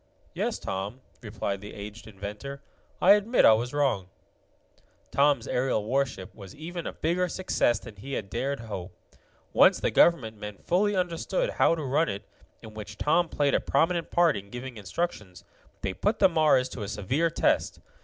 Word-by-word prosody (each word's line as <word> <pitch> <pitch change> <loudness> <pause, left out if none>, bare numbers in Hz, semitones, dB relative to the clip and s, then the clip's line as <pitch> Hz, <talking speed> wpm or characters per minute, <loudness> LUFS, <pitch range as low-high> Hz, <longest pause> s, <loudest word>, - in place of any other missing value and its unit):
"Yes, - - -1
Tom," 100 +7 -5 0.2
replied 105 -3 -4
the 105 - -9
aged 105 +2 -9
inventor, 105 +7 -7 0.4
"I 190 - +6
admit 210 +4 +4
I 110 - +9
was 120 +3 -1
wrong." 135 -11 0 1.0
Tom's 145 0 +3
aerial 125 -4 0
warship 125 -6 -1
was 100 -3 -12
even 170 +3 -6
a - - -3
bigger 175 +3 0
success 170 -11 +1
than 110 -1 -11
he 135 +8 -7
had 100 - -3
dared 135 +4 -1
to - - -10
hope. 95 -4 -7 0.6
Once - - +6
the - - 0
government 115 -11 +3
men 105 -1 -7
fully 200 - +1
understood 185 - -1
how 165 - +3
to 160 - -5
run 145 +4 +1
it, 100 +1 -5 0.4
in 110 - -10
which 105 0 -8
Tom 165 +3 +2
played 145 -2 +1
a - - +4
prominent 165 +4 +1
part 170 -3 +3
in 100 0 -7
giving 125 +2 -7
instructions, 105 - -4 0.4
they 95 - -1
put 210 - 0
the 195 - +6
Mars 155 -7 +3
to 120 - -7
a 100 - -4
severe 125 - 0
test. 165 - +1
130 Hz, 175 wpm, -27 LUFS, 105-165 Hz, 1.0 s, I